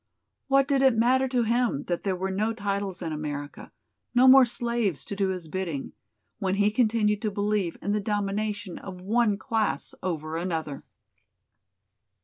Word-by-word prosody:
What 275 0 +4
did 275 -2 +2
it 265 -4 +4
matter 260 +3 +3
to 250 -2 +1
him 230 - +1
that 175 -1 -2
there 195 -2 -1
were 190 +1 -3
no 215 +4 0
titles 200 -3 -3
in 160 -2 -3
America, 145 -1 -6 0.4
no 250 +2 +6
more 265 0 +9
slaves 235 -7 -1
to 200 - -5
do 195 -1 +1
his 180 -3 -4
bidding, 165 -5 -4 0.5
when 190 -2 0
he 205 +1 +3
continued 215 -2 +2
to 220 - 0
believe 205 -3 -1
in 205 - -1
the 210 0 0
domination 205 -1 -2
of 185 -2 -9
one 215 +1 +2
class 215 -10 -1
over 160 -3 -3
another. 160 -5 -3
205 Hz, 160 wpm, -26 LUFS, 180-230 Hz, 0.5 s, more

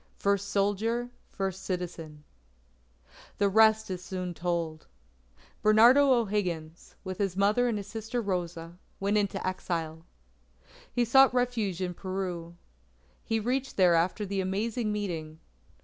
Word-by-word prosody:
FIRST 200 0 0
SOLDIER, 220 +5 0 0.2
FIRST 190 -1 -4
CITIZEN 165 -5 -5 1.1
The 200 -1 +2
rest 220 0 +4
is 180 -1 -5
soon 180 -1 -4
told. 170 -2 -3 0.7
Bernardo 235 +6 +6
O'Higgins, 185 -9 -1
with 190 0 -6
his 195 -2 -1
mother 210 +5 +3
and 230 -3 0
his 200 - -5
sister 225 +3 -4
Rosa, 175 -4 -4 0.2
went 200 +2 0
into 200 -1 -2
exile. 165 -3 -3 0.9
He 245 -1 +1
sought 265 +2 +6
refuge 230 -7 0
in 180 -1 -2
Peru. 180 -2 -5 0.7
He 225 -1 0
reached 260 +4 -2
there 180 -3 +5
after 175 +5 +1
the 195 0 -2
Amazing 210 +4 -1
Meeting. 165 -7 -4
195 Hz, 125 wpm, -29 LUFS, 175-220 Hz, 1.1 s, Bernardo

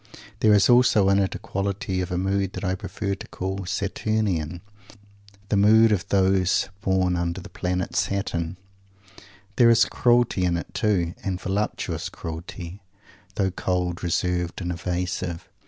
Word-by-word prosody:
There 105 -1 +5
is 100 - +5
also 120 -5 +5
in 100 0 +4
it 95 -1 0
a - - -3
quality 95 -1 -3
of 90 - -3
mood 95 +1 -1
that - - -6
I 95 -1 0
prefer 100 +1 -4
to 100 - -8
call 95 0 -4
Saturnian 95 -4 -1 0.9
the - - +2
mood 110 +2 +6
of 95 -4 0
those 95 0 +2
born 95 -3 +1
under 85 +1 -2
the 90 - -10
planet 90 0 -2
Saturn. 90 -3 -1 1.0
There 120 -1 +6
is 115 -1 +6
cruelty 120 -5 +2
in 85 -1 +1
it, 85 - -7
too, 95 -7 +1
and 95 -2 -2
voluptuous 100 +3 -2
cruelty, 85 +3 -7 0.5
though 95 -2 +1
cold, 90 -1 -2
reserved, 90 0 -1
and 90 -2 -3
evasive. 90 0 -3
95 Hz, 145 wpm, -24 LUFS, 90-100 Hz, 1.0 s, mood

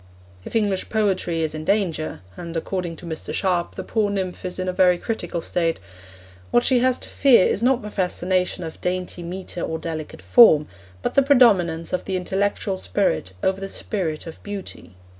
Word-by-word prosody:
If - - -9
English 205 -4 +1
Poetry 185 -6 0
is 155 - -1
in 155 0 -5
danger 170 - -1
and, 170 -1 -6
according 175 0 -3
to 175 - -12
Mr. 160 -2 -4
Sharp, 180 -3 0
the - - -5
poor 215 -2 0
nymph 190 -3 -3
is 180 - -3
in 185 0 -3
a 185 - -1
very 180 -1 +4
critical 180 -4 -3
state 165 0 -1 0.7
what 240 - +3
she 255 -1 +3
has 255 0 +2
to - - -11
fear 250 -9 +5
is - - 0
not 250 -1 +2
the 210 - -6
fascination 180 -1 -1
of 160 -1 -8
dainty 180 0 -2
metre 180 0 -6
or 160 - -2
delicate 160 -2 -6
form, 155 -11 +7 0.4
but - - -1
the 275 - +5
predominance 200 - +4
of 180 - -1
the 190 - -2
intellectual 190 - -1
spirit 90 -1 -1
over 190 +1 +1
the 195 - -4
spirit 170 -9 -3
of 165 - -10
beauty. 200 - -8
185 Hz, 185 wpm, -23 LUFS, 165-205 Hz, 0.7 s, form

